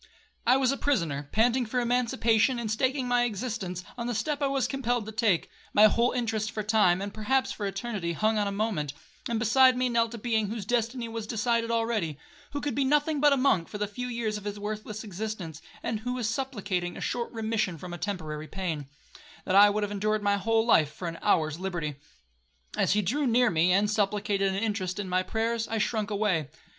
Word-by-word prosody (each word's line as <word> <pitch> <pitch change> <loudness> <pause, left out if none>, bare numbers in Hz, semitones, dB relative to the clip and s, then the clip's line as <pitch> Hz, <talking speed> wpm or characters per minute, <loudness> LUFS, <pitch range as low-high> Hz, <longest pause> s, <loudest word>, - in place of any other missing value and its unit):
I 250 +2 +6
was 265 -1 +2
a 275 - -2
prisoner, 155 - -1
panting 240 +2 +2
for 250 +3 -1
emancipation, 235 -1 +2
and 230 -3 -3
staking 260 +3 0
my 245 0 +3
existence 205 -5 -4 0.2
on 235 - -2
the 240 - -2
step 285 +7 -1
I 280 - +2
was 270 -1 0
compelled 245 -4 -1
to 220 - -6
take,—my 210 -1 +1
whole 235 +3 +3
interest 220 -3 -1
for 215 - -4
time, 200 -4 +3
and 200 0 -5
perhaps 260 +5 0
for 205 - -3
eternity, 195 -3 -3
hung 215 +6 +1
on 205 - +1
a - - -1
moment; 200 -9 -1 0.4
and 230 - 0
beside 255 +3 +5
me 255 0 +1
knelt 230 0 +1
a - - -6
being 220 -2 0
whose 215 -1 -5
destiny 235 +2 -1
was 225 -1 -5
decided 230 +1 0
already, 225 -10 0 0.3
who 285 - -4
could 290 - -2
be 275 - +1
nothing 295 +2 +2
but 295 -1 +6
a 280 - +4
monk 220 - +2
for 210 - -6
the 210 - 0
few 230 +5 -5
years 230 -3 -2
of - - -14
his 205 0 -4
worthless 215 +1 -5
existence, 195 -6 -5 0.2
and 220 -2 -2
who 245 +3 -3
was 245 -3 -2
supplicating 205 -8 -2
a - - -6
short 235 -1 -2
remission 220 -5 -1
from 175 +2 -8
a 175 - -6
temporary 155 -6 -4
pain, 165 -7 -4 0.6
that - - -1
I 205 +1 +8
would 210 +1 -1
have 205 - -2
endured 210 +1 0
my 200 0 +2
whole 225 +3 +2
life 155 -10 +4
for 175 +3 -6
an 165 0 -5
hour's 155 -5 +1
liberty. 170 -6 -3 0.8
As - - +2
he 210 0 +2
drew 275 +9 0
near 245 0 +4
me, 170 +2 +3
and 200 +3 +3
supplicated 205 -1 +1
an - - -3
interest 200 -4 -2
in 205 -2 -3
my 185 0 +1
prayers, 225 +4 -1
I 225 - -2
shrunk 215 -1 0
away. 200 -8 0
215 Hz, 215 wpm, -28 LUFS, 195-240 Hz, 0.8 s, I